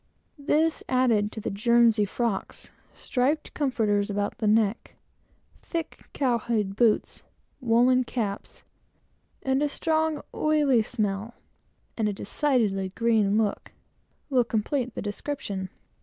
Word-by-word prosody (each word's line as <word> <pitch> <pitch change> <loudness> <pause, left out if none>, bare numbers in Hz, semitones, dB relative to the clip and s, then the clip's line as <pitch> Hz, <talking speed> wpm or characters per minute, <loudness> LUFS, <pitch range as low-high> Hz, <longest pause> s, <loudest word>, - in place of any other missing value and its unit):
This, 310 +3 +1
added 230 -5 +2
to - - -6
guernsey 230 +1 +3
frocks, 225 0 -3 0.2
striped 285 +4 -1
comforters 215 -8 0
about 205 0 -2
the 215 - 0
neck, 215 0 +1 0.7
thick 330 -2 -5
cowhide 230 -6 0
boots, 225 -1 +1 0.4
woollen 250 +2 +3
caps, 215 -5 -5 0.8
and 265 +1 +1
a 295 - +1
strong, 315 0 0
oily 295 -6 +3
smell, 215 0 -3 0.6
and 215 -2 0
a - - -2
decidedly 205 -4 0
green 215 -1 +2
look, 215 -2 -1 0.5
will 260 -4 +3
complete 235 +3 -2
the - - -4
description. 205 -3 -4
235 Hz, 110 wpm, -26 LUFS, 205-265 Hz, 0.8 s, guernsey